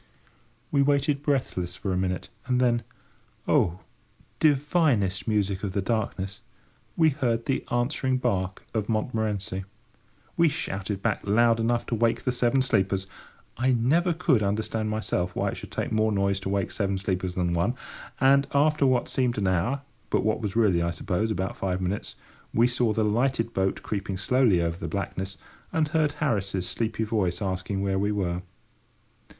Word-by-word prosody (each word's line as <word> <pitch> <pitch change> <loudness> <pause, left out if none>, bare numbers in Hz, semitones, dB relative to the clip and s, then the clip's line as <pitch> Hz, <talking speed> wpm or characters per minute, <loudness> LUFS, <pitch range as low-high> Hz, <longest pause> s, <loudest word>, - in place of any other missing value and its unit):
We 140 - +3
waited 140 0 +2
breathless 120 - -1
for 95 0 -3
a - - 0
minute, 90 0 -2 0.2
and 125 -1 +2
then—oh! 120 -6 -1 0.6
divinest 140 - +2
music 100 -3 0
of 95 -2 -2
the 100 - 0
darkness!—we 100 - -2
heard 120 -5 -1
the 135 - 0
answering 130 +1 0
bark 95 -6 -1
of 110 -3 -1
Montmorency. 110 -4 -1 0.7
We 170 -1 +4
shouted 100 -9 -4
back 110 -3 0
loud 115 +3 +3
enough 120 +1 +1
to - - -4
wake 115 +1 +1
the 125 - +1
Seven 125 +1 +2
Sleepers—I 95 +4 -1
never 150 +10 +2
could 160 - +2
understand 110 +2 -1
myself 105 -4 -1
why - - 0
it - - -5
should - - -8
take - - -3
more 110 0 +2
noise 100 -1 +1
to 95 - -4
wake 100 -1 0
seven 100 -2 -1
sleepers 95 -1 -2
than 90 -1 0
one—and, 135 - +1
after 150 0 +4
what 125 -2 +2
seemed 125 -3 0
an 100 - 0
hour, 95 +10 +1 0.3
but - - +1
what 110 +1 +1
was 105 -2 -3
really, 100 -7 +3
I 85 - +1
suppose, 90 +5 -1
about 95 -3 -2
five 95 -1 -1
minutes, 95 +2 -3 0.4
we 115 - +5
saw 120 -2 +1
the 110 0 +1
lighted 115 +1 +1
boat 95 0 0
creeping 100 -2 -3
slowly 105 -4 +3
over 85 0 -1
the 95 - -5
blackness, 95 -1 -4 0.3
and 155 -2 +1
heard 155 -1 +1
Harris's 100 - -1
sleepy 110 -1 -2
voice 100 -6 0
asking 95 0 -2
where 95 -1 0
we 100 +1 +1
were. 90 -4 -1
110 Hz, 160 wpm, -26 LUFS, 95-125 Hz, 0.7 s, we